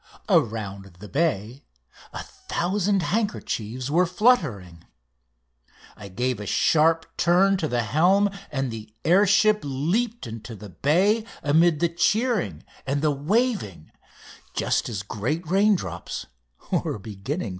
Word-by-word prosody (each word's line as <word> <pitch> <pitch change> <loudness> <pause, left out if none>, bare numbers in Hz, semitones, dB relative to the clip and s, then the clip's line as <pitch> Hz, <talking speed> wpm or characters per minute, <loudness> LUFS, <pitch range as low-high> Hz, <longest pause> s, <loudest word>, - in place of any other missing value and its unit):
Around 100 -4 0
the 105 +3 -10
bay 135 - -1 0.5
a - - -6
thousand 195 +1 -1
handkerchiefs 130 - -2
were 175 +3 +3
fluttering. 140 - +1 1.1
I 105 - -10
gave 120 +5 -2
a 105 - -6
sharp 160 +6 +3
turn 185 +3 +4
to 160 - -1
the 120 -4 0
helm, 185 - +3 0.2
and 135 -3 -2
the 110 -1 -9
air 190 +5 +5
ship 210 +2 +4
leaped 175 - -1
into 115 0 -8
the 105 0 -10
bay 185 - +2 0.2
amid 160 +2 +3
the 170 - +4
cheering 220 +5 0 0.2
and 140 +2 -1
the 155 - +3
waving 150 - -1 0.6
just - - 0
as 100 -4 -4
great 125 - -3
raindrops 190 - 0 0.5
were - - -1
beginning 105 - -5
to - - -3
fall. - - -4
150 Hz, 130 wpm, -24 LUFS, -, 1.1 s, air